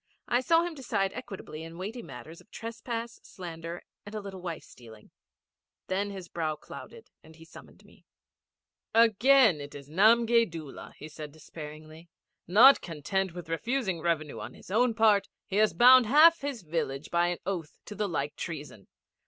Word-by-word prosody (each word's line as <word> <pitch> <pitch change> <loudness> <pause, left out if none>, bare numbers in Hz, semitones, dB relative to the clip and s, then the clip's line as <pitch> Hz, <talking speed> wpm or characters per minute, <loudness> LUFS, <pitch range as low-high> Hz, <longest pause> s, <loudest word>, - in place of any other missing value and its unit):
I 245 +1 +2
saw 330 +5 +3
him 345 -1 -4
decide 200 -9 -2
equitably 195 -10 -8
in 165 +1 -9
weighty 210 +7 -5
matters 140 - -11
of - - -25
trespass, 230 0 -6
slander, 170 -2 -8 0.2
and 205 +1 -10
a - - -2
little 195 -2 -8
wife 170 -3 -5
stealing. 110 -3 -16 0.7
Then 195 +2 -1
his 190 -3 -8
brow 160 -2 -2
clouded 455 - -12
and 160 0 -16
he 165 0 -15
summoned - - -15
me. - - -22 0.9
'Again 230 - +5
it 145 0 -9
is 140 -1 -10
Namgay 230 +5 +4
Doola,' 160 -4 -9
he 155 - -9
said 150 -1 -9
despairingly. 155 +1 -11 0.4
'Not 235 +10 +7
content 175 +3 -3
with 175 -3 -8
refusing 190 +1 -2
revenue 155 -3 -1
on 110 +4 -8
his - - -14
own 235 +2 +2
part, 215 -3 +4 0.2
he 195 - -3
has 215 0 +4
bound 250 -1 +7
half 315 +6 +6
his 275 -7 -4
village 150 -3 -3
by 175 0 +2
an 175 0 -2
oath 175 -5 -4
to - - -8
the 210 -1 -2
like 145 -3 -3
treason. 150 - -7
185 Hz, 170 wpm, -29 LUFS, 160-230 Hz, 0.9 s, Not